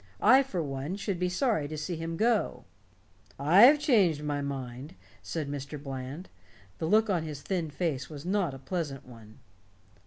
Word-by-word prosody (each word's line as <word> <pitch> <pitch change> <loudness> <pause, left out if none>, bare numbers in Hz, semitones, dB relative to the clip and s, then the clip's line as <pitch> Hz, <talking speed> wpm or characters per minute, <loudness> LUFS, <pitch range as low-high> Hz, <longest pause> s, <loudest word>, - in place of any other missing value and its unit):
I 265 +2 +7
for 190 -11 -3
one 140 +4 -4
should 200 -3 -3
be 180 0 0
sorry 185 - 0
to 155 +1 -6
see 170 +4 -3
him 165 +1 -4
go." 225 +1 +1 0.7
"I've 195 - +7
changed 195 - +3
my 145 -1 -2
mind," 135 +3 -6 0.3
said 155 -4 -4
Mr. 140 +1 -5
Bland. 135 +4 -6 0.5
The 160 - -1
look 215 +5 +4
on 175 -3 +1
his 150 -3 -7
thin 175 -5 -2
face 145 -3 -2
was 150 0 -9
not 185 -6 0
a - - -8
pleasant 135 0 -4
one. 110 -3 -14
155 Hz, 165 wpm, -29 LUFS, 140-185 Hz, 0.7 s, I